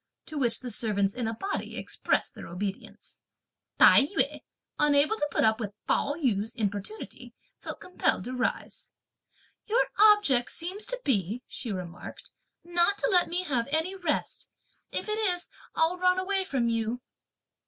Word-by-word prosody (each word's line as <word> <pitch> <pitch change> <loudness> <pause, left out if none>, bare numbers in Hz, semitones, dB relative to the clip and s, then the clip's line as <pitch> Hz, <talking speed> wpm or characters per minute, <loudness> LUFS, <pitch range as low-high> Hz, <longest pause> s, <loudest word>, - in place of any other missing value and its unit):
To 310 -2 -5
which 240 -4 +1
the 250 -2 -5
servants 200 -3 +1
in 245 -3 -2
a 225 - -2
body 390 - -4
expressed - - 0
their - - -9
obedience. 195 +3 -6 0.6
Tai 275 - +7
yü, 400 - 0 0.4
unable 295 +5 +4
to 295 - -1
put - - +1
up 220 +1 +3
with 205 -3 -5
Pao 285 - +1
yü's 225 - -1
importunity, 205 - -5 0.2
felt - - -7
compelled 365 - 0
to 250 - -5
rise. 250 - -3 0.8
"Your 460 +4 +2
object 415 - +5
seems 375 +5 -4
to - - -2
be," 220 - 0
she 235 - -4
remarked, 180 -2 -7 0.3
"not 345 +3 +1
to - - 0
let 360 -2 +4
me 355 +2 -1
have 255 -9 -1
any 320 +5 0
rest. 350 -6 -3 0.4
If - - -2
it 425 +1 -1
is, 360 -5 0 0.3
I'll 330 +3 +2
run 365 0 +3
away 380 0 0
from 260 -8 0
you." 230 +1 -1
285 Hz, 155 wpm, -28 LUFS, 225-365 Hz, 0.8 s, Tai